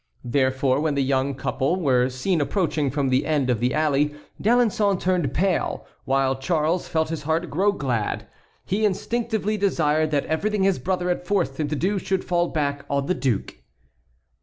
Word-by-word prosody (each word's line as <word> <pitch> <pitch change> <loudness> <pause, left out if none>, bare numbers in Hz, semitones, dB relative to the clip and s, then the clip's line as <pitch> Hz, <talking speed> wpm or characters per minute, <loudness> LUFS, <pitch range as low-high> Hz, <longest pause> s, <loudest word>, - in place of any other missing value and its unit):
Therefore 130 +1 +1
when 150 -1 0
the 140 - +2
young 135 +1 0
couple 135 +4 -1
were 130 -6 +2
seen 150 +7 0
approaching 155 -3 0
from 140 0 0
the 130 +2 +2
end 145 -5 +1
of 120 - 0
the 125 +2 +1
alley, 150 -1 +1 0.3
D'Alençon 215 -4 +2
turned 180 -7 0
pale, 185 +4 0 0.2
while 135 0 +1
Charles 160 +4 0
felt 160 -1 0
his 165 -1 -3
heart 160 +3 -1
grow 195 +7 +2
glad; 125 - -2 0.4
he 205 +4 -1
instinctively 215 +1 0
desired 155 -6 +1
that 145 -2 0
everything 205 +5 0
his 195 -6 +2
brother 180 +5 -1
had 180 0 -2
forced 175 -9 0
him 150 - 0
to 150 - -2
do 195 +6 0
should 190 0 -2
fall 175 -1 +1
back 145 -3 -2
on 140 -1 0
the 185 - +1
duke. 125 - -2
155 Hz, 175 wpm, -24 LUFS, 135-185 Hz, 0.4 s, the